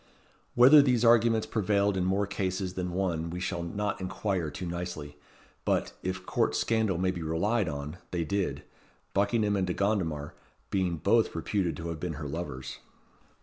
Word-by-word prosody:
Whether 135 +5 +9
these 125 -4 +2
arguments 115 -1 +5
prevailed 100 -2 +1
in 90 -1 0
more 95 +2 +1
cases 95 -2 -2
than 90 -1 -3
one 85 -3 -1
we 90 +1 -5
shall 90 -1 -2
not 100 +4 -3
inquire 95 -2 -2
too 75 +5 -6
nicely; 85 -4 -5 0.5
but, - - 0
if 90 0 -4
court - - +1
scandal 110 -5 +1
may 95 +1 +1
be 90 -2 -6
relied 85 +6 0
on, 75 +3 -5
they 85 -2 -1
did 80 -5 -2 0.5
Buckingham 105 +1 +2
and 95 -2 0
De 90 - -1
Gondomar 85 -8 -1 0.4
being 90 -3 0
both 105 +7 +2
reputed 85 +1 -1
to 85 0 -5
have 85 -2 -5
been 85 0 -3
her 75 0 -5
lovers. 70 -4 -5
95 Hz, 165 wpm, -29 LUFS, 85-100 Hz, 0.5 s, Whether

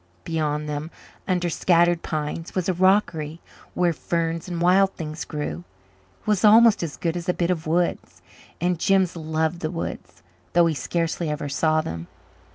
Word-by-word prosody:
Beyond 150 -2 -2
them, 150 +1 -4 0.4
under 180 -2 +1
scattered 175 0 +3
pines, 155 +2 -4
was 185 -2 -1
a 185 - +2
rockery 175 -4 +1 0.4
where 175 -1 +2
ferns 165 +1 -2
and 175 -2 -4
wild 190 +3 +4
things 155 0 -5
grew. 115 - -4 0.6
It - - -30
was 210 -2 +1
almost 225 +1 +7
as 165 -4 -4
good 165 -1 -2
as 175 +1 -4
a 180 - +2
bit 175 0 0
of 160 -3 -3
woods 170 +2 -1 0.4
and 175 0 0
Jims 190 -1 +2
loved 160 +1 -1
the 155 - -2
woods, 125 - -6 0.3
though 175 0 +5
he 165 - +1
scarcely 165 +3 -2
ever 150 -1 -3
saw 155 +3 +1
them. 85 - -6
165 Hz, 165 wpm, -24 LUFS, 155-180 Hz, 0.6 s, almost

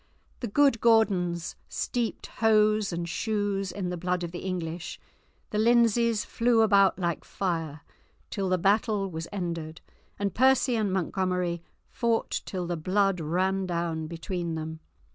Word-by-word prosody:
The 240 - -3
good 275 +1 +3
Gordons 185 -7 +2
steeped 240 -2 -2 0.2
hose 215 -2 +4
and 170 0 -3
shoes 205 0 -1
in 185 -3 -3
the 180 - -3
blood 180 +1 -1
of 170 - -4
the 175 - -6
English; 175 -2 -4 0.5
the 210 - 0
Lindsays 235 -1 +3
flew 230 -1 +2
about 200 -3 +4
like 170 -3 -2
fire 165 -6 -3 0.5
till 195 -2 -1
the 185 - +3
battle 200 +1 +1
was 160 0 -5
ended, 170 -4 -4 0.4
and 200 -2 -1
Percy 260 +1 +4
and 215 -3 0
Montgomery 180 -1 -1 0.3
fought 230 -1 -1
till 185 -2 -3
the 175 0 -2
blood 190 +3 +1
ran 185 +4 0
down 170 -2 -2
between 170 0 -4
them. 160 0 -5
190 Hz, 145 wpm, -27 LUFS, 170-215 Hz, 0.5 s, hose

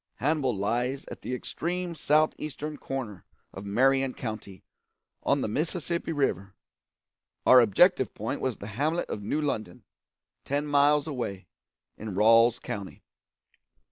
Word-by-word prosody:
Hannibal 135 -5 0
lies 125 +7 -1
at - - -8
the 125 - -3
extreme 175 +6 -3
south 155 -1 +2
eastern 150 0 -5
corner 115 -9 -5 0.3
of 95 - -8
Marion 135 +5 +2
County, 105 -5 -7 0.6
on - - +1
the - - -1
Mississippi 165 - -2
River; 100 - -1 0.9
our 130 - +8
objective 130 - +4
point 110 - -4
was 130 -3 -1
the - - -9
hamlet 145 - -1
of 105 - -4
New 105 +9 -1
London, 110 -11 -3 0.6
ten 145 +2 -1
miles 145 0 +3
away, 120 - -4 0.5
in 105 -3 -6
Ralls 115 +3 +5
County. 100 -2 -7
130 Hz, 130 wpm, -28 LUFS, 105-150 Hz, 0.9 s, our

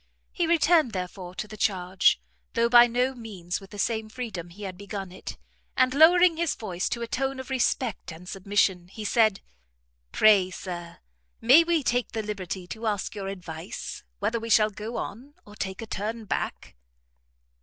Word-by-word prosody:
He 345 -2 0
returned, 325 -6 +4
therefore, 180 -1 -5
to 215 - -4
the 215 - -9
charge, 185 - +2 0.3
though 235 0 +2
by 240 0 +8
no 250 +3 +1
means 200 -7 -5
with 195 - -13
the 205 - -10
same 220 +1 -1
freedom 215 -8 -6
he 200 +5 -11
had 190 -2 -5
begun 195 -1 -6
it, 185 - -8 0.4
and 255 0 +4
lowering 335 +3 +6
his 335 -2 0
voice 185 -5 -3
to 235 - -3
a - - -4
tone 270 +2 -2
of 260 0 -7
respect 250 -6 0
and 165 +3 -11
submission, 190 -2 0
he 215 +3 -8
said, 215 -2 +3 0.7
"Pray, 200 -4 +5
Sir, 175 -2 -7 0.4
may 265 +9 +7
we 335 -3 +1
take 245 0 0
the 220 -1 -2
liberty 190 -3 -5
to 220 +5 -5
ask 210 +2 -1
your 200 -2 -5
advice, 170 -4 -7
whether 235 +1 -1
we 230 +1 -6
shall 215 -1 +5
go 215 +4 -6
on, 270 +7 -6
or 210 - -13
take 190 +1 -4
a - - -5
turn 220 +2 -4
back?" - - -4
215 Hz, 175 wpm, -26 LUFS, 190-245 Hz, 0.7 s, by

